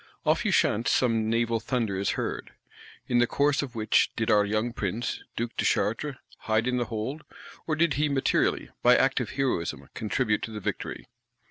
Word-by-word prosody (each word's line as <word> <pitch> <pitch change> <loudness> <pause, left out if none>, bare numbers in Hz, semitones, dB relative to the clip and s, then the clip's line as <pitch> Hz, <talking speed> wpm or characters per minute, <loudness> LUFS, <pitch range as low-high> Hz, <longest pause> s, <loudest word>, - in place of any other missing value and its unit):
Off - - +2
Ushant 115 +3 +2
some 115 -3 +2
naval 115 0 +1
thunder 115 -5 -1
is 95 +1 0
heard. - - -4 0.5
In 120 - +2
the 120 - +4
course 145 +3 +2
of 130 -4 -6
which 110 -1 +3
did 115 -1 0
our 105 -1 +5
young 110 +3 -1
Prince, 110 +2 -3
Duke 120 0 -3
de - - 0
Chartres, 135 +7 0 0.2
"hide 110 +1 0
in 125 0 +1
the 120 - 0
hold;" 120 +7 -4 0.4
or 155 - +1
did 165 -1 +2
he 150 +2 +1
materially, 135 -2 +1
by - - +6
active - - +1
heroism, 130 -11 -2
contribute 105 0 0
to - - -4
the 105 - -5
victory? - - -4
115 Hz, 175 wpm, -27 LUFS, 110-130 Hz, 0.5 s, by